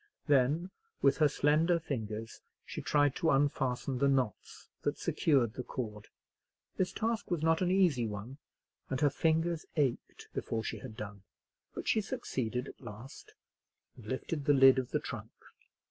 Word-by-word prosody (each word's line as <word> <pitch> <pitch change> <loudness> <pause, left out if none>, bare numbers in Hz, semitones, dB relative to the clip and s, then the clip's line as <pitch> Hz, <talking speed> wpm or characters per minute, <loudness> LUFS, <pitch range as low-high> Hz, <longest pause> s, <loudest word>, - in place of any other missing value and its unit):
Then 145 +5 +2 0.3
with 140 - +5
her 155 - +5
slender 155 +4 +3
fingers 115 -7 -5 0.2
she - - -6
tried 145 -2 +2
to 165 - +1
unfasten 135 -2 +1
the 140 - +4
knots 130 -6 -1
that - - -1
secured 130 -8 +2
the 130 - -4
cord. 110 -5 -6 0.7
This 185 - 0
task 225 0 -2
was 170 -4 -1
not 165 +1 +3
an 180 - +2
easy 175 -11 +3
one, 110 +7 -7 0.5
and 130 - -1
her 145 -2 +4
fingers 165 +1 +1
ached 140 -6 -1
before 110 -1 -2
she 110 - -4
had 110 +2 -9
done. 105 -2 -7 0.5
But - - -6
she 220 - +3
succeeded 125 - -3
at - - -12
last, 110 +6 -10 0.6
and 115 -4 -13
lifted 140 +4 -3
the 145 - +5
lid 135 0 +7
of 130 - -4
the - - 0
trunk. - - -7
135 Hz, 160 wpm, -32 LUFS, 120-160 Hz, 0.7 s, lid